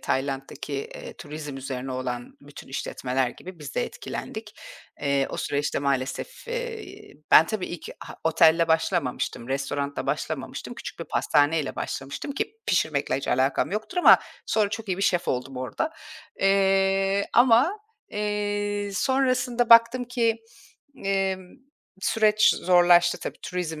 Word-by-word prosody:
Tayland'daki, 135 +2 -3
eee, 140 - -6
turizm 150 -2 -7
üzerine 130 -1 -5
olan 125 -1 -5
bütün 145 +1 -13
işletmeler 130 -1 -2
gibi 180 +7 -11
biz 145 -2 -8
de - - +1
etkilendik. - - -7 0.5
Eee, 140 -1 +1
o - - -5
süreçte 145 +1 -1
maalesef, 140 - -3
eee, 450 -5 -6 0.2
ben, 160 - +8
tabii 210 -1 -3
ilk 175 - -7
ha - - -9
otelle 165 +1 +4
başlamamıştım, 160 -7 0
restoranla 140 +1 -2
başlamamıştım, - - -4
küçük - - -8
bir - - -5
pastaneyle 145 0 +1
başlamıştım, 140 - -5
ki 425 +10 -4
pişirmekle 155 -5 +1
hiç 135 - -5
alakam 130 +2 +1
yoktur 215 - -4
ama 355 - +8 0.3
sonra 215 -2 +2
çok 225 0 -5
iyi 185 - 0
bir 195 - -3
şef 175 -3 +1
oldum 125 +1 -2
orada. 125 -3 -2 0.5
Eee, 195 0 +3
ama, 250 - +5 0.3
eee, 205 -1 -2
sonrasında 255 -1 +1
baktım 230 +2 +7
ki, 235 -2 +1 0.7
emm, 195 -1 0 0.6
süreç 215 +1 +4
zorlaştı 175 -1 +4
tabii, - - -6
turizm 170 -4 -4
175 Hz, 130 wpm, -25 LUFS, 140-215 Hz, 0.7 s, ben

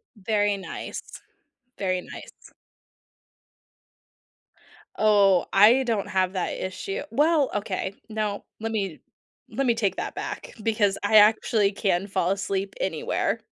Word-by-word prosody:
Very 205 0 0
nice. 190 - -6 0.8
Very 185 -2 -1
nice. - - -12 2.5
Oh, 200 -4 +4
I 220 +7 +6
don't 225 -5 -1
have 185 0 0
that 185 -2 -2
issue 185 +1 -4
well, 295 +2 +3
okay. 200 -1 -3
No, 215 -2 -3 0.2
let 225 0 -3
me 195 -7 -3 0.5
let 275 - -2
me 235 - +3
take 210 -4 -1
that - - -4
back, - - -6
because 210 -3 +1
I 215 +1 +5
actually 210 -1 +4
can 195 -1 0
fall 190 -2 0
asleep 195 0 -2
anywhere. 190 +5 -1
205 Hz, 120 wpm, -25 LUFS, 190-220 Hz, 2.5 s, I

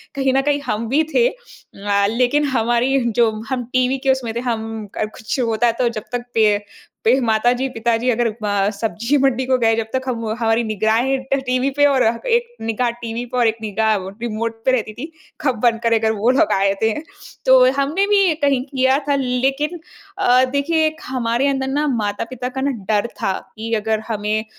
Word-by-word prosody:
कहीं 270 -1 +1
न 270 - +4
कहीं 290 0 +1
हम 220 +2 -2
भी 290 +5 +3
थे 485 0 +5
अ, 205 - -3
लेकिन 250 +6 +2
हमारी 240 +4 +2 0.2
जो 235 -2 +5 0.2
हम 255 -2 -2
टीवी 255 +1 +2
के 265 - +5
उसमें 250 -4 -2
थे - - -1
हम 225 -1 -5
क 215 - -1
कुछ 220 +4 -4
होता 230 0 +2
तो 240 - +3
जब 215 -3 -6
तक 245 0 -2
पे 215 -2 +4 0.5
पे 250 +4 +4
माताजी-पिताजी 235 +1 +1
अगर 240 0 +2 0.2
म 205 -1 +1
सब्ज़ी 225 +6 -1
मंडी 260 -1 +2
को 260 0 +2
गए 225 -1 +3
जब 225 -1 -2
तक 260 - -1
हम 235 -3 -2
हमारी 225 0 +2
निगराहें 220 +5 +1
ट - - +5
टीवी 255 +1 +1
पे 290 +1 +3
और 275 -3 +3 0.2
एक 475 0 +2 0.2
निगाह 225 +2 0
टीवी 230 +1 -4
पर 250 - 0
और 235 - +4
एक 225 0 0
निगाह 220 +1 +1 0.3
रिमोट 230 -1 -2
पे 260 - +4
रहती 220 -4 -1
थी, 305 +9 -8 0.3
कब 260 -5 +1
बंद 230 -1 +3
करें 230 -1 +2
अगर 220 0 +1
वो 220 +2 0
लोग 325 - +3
आए 195 0 +2
ते 220 - +2
हैं? 295 +8 -4 0.4
तो 260 -1 +6
हमने 285 +8 +1
भी 395 -4 +4
कहीं 275 -3 +3
किया 260 0 +2
था 285 - +3
लेकिन 270 +5 -1 0.4
अ, 255 -10 +4
देखिए 285 +5 +1
एक 315 0 -6
हमारे 250 0 0
अंदर 270 -1 0
ना 290 +3 0
माता-पिता 230 +1 -2
का 265 +1 -5
ना 280 - +1 0.2
डर 210 +1 +2
था 195 - +1 0.3
कि 225 +1 -5
अगर 220 0 0
हमें 215 0 -1
245 Hz, 200 wpm, -19 LUFS, 225-270 Hz, 0.5 s, तो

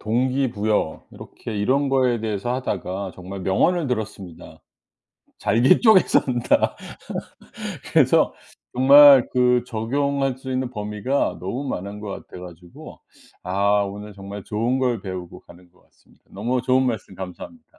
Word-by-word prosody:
동기부여 115 - -1
이렇게 110 - -9
이런 135 +7 +1
거에 130 -4 +1
대해서 110 +2 -2
하다가 95 -6 -4
정말 95 +1 -8
명언을 150 - +1
들었습니다. 105 -7 -6 0.8
"잘게 120 - +3
쪼개 220 -6 +7
산다." 120 -3 +1 1.2
그래서 - - +4 0.4
정말 140 0 +8
그 125 -1 +3
적용할 135 +3 -1
수 130 0 -7
있는 130 -1 -2
범위가 105 +4 -2
너무 120 +10 -4
많은 100 +1 -5
것 105 - -6 0.2
같아 - - -11
가지고 90 -1 -12 0.4
아 100 +3 +1
오늘 105 +1 -7
정말 100 0 -9
좋은 120 +5 -1
걸 120 -5 0
배우고 90 -2 -7
가는 90 0 -18
것 90 - -28
같습니다. - - -29
너무 120 +5 -2
좋은 130 +1 +2
말씀 110 -6 -4
감사합니다. 95 - -9
110 Hz, 295 characters per minute, -22 LUFS, 100-130 Hz, 1.2 s, 정말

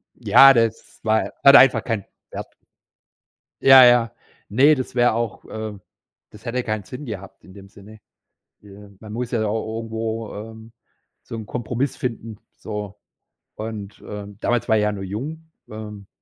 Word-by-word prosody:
ja, 135 0 +7
das 115 -2 -1
war 110 0 +1
hat 140 0 +9
einfach 130 -5 +6
keinen 110 -5 -3 0.3
Wert. - - -8 1.1
Ja, 135 -1 +9
ja. 120 -1 +4 0.3
Ne, 135 +8 +5
das 130 -1 -6
wäre 120 -1 +3
auch, 115 -1 -4
äh 110 -1 -7 0.5
das 105 +2 -16
hätte 125 +1 -2
keinen 110 -2 -3
Sinn 125 +9 -9
gehabt 100 -3 -9
in 95 - -16
dem 100 -1 -13
Sinne, 105 +2 -15 0.6
ähm, 100 0 -15
man 110 -1 -10
muss 120 +2 -4
ja 120 - -1
au 110 +1 -3
irgendwo, 115 0 -5
ähm, 110 +2 -10 0.5
so 115 - -8
‘n 110 -2 -7
Kompromiss 125 +4 -3
finden, 115 -3 -5 0.2
so 105 -2 -6 0.6
und, 105 -2 -7
ähm 100 -1 -8
damals 120 -1 -1
war 110 - +4
ich 105 - +2
ja 105 0 +1
nur 100 -2 -6
jung. 145 +12 -6 0.2
Ähm, 105 -2 -9
110 Hz, 160 wpm, -22 LUFS, 105-120 Hz, 1.1 s, hat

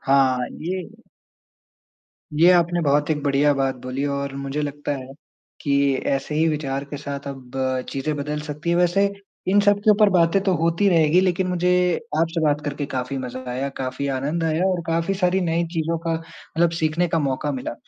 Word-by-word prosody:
हाँ 135 -2 +3
ये 180 +2 -3 1.5
ये 175 +2 +8
आपने 175 0 +3
बहुत 145 +1 +2
एक 150 -1 0
बढ़िया 145 +1 +3
बात 135 -1 0
बोली 130 +2 -3
और 140 -1 -4
मुझे 140 +2 -3
लगता 145 0 -3
है 130 -1 -8 0.5
कि 145 - -1 0.3
ऐसे 140 +2 -1
ही 160 +2 +3
विचार 140 -3 -2
के 145 - -4
साथ 140 0 -6
अब 130 -3 -9 0.4
चीज़ें 140 +3 -2
बदल 150 +1 -3
सकती 150 +2 -4
हैं। 170 - +2
वैसे 180 +3 +3 0.4
इन 200 +2 +5
सबके 205 +1 +3
ऊपर 210 0 +5
बातें 180 +1 +3
तो 190 -2 +2
होती 170 +5 +2
रहेगी 165 -1 +4
लेकिन 185 0 +1
मुझे 180 0 +1 0.5
आपसे 165 0 0
बात 150 -1 +2
करके 145 0 -3
काफ़ी 130 0 -3
मज़ा 130 0 -6
आया, 130 +3 -2
काफ़ी 135 0 -4
आनंद 140 +5 -1
आया 160 +2 +1
और 185 -2 +1
काफ़ी 165 +3 0
सारी 185 0 +1
नई 170 -1 0
चीज़ों 165 0 -1
का 165 - +1
मतलब 165 0 -2
सीखने 160 +3 +1
का 165 - +1
मौका 145 0 -1
मिला। 130 -3 -4
155 Hz, 180 wpm, -22 LUFS, 140-170 Hz, 1.5 s, ये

